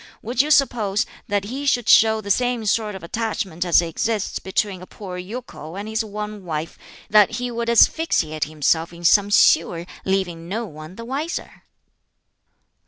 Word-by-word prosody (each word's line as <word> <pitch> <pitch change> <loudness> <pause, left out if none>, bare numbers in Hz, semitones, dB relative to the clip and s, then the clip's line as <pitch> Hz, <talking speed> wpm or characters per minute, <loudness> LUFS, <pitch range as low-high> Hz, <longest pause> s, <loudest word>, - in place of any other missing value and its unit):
Would 240 +3 +1
you 295 - -2
suppose 235 -8 +2 0.2
that 205 -3 0
he 265 +7 -5
should 245 -4 +1
show 220 -1 +6
the 200 -1 -3
same 245 +1 0
sort 210 0 0
of 190 - -9
attachment 190 -3 -3
as 175 -1 +4
exists 205 +6 -2
between 190 0 -2
a 185 - -10
poor 190 -4 -8
yokel 185 -5 -8
and 200 +2 -6
his 220 +1 -1
one 210 -1 -6
wife 160 -1 -4 0.4
that 210 -2 +5
he 245 +1 -3
would 235 0 -3
asphyxiate 200 - +3
himself 155 +2 0
in 170 0 -12
some 200 +4 +5
sewer, 170 -4 +4 0.2
leaving 175 -3 -2
no 225 +4 -2
one 155 -1 -11
the 230 - -8
wiser?" 285 +7 -5
205 Hz, 165 wpm, -22 LUFS, 175-230 Hz, 0.4 s, show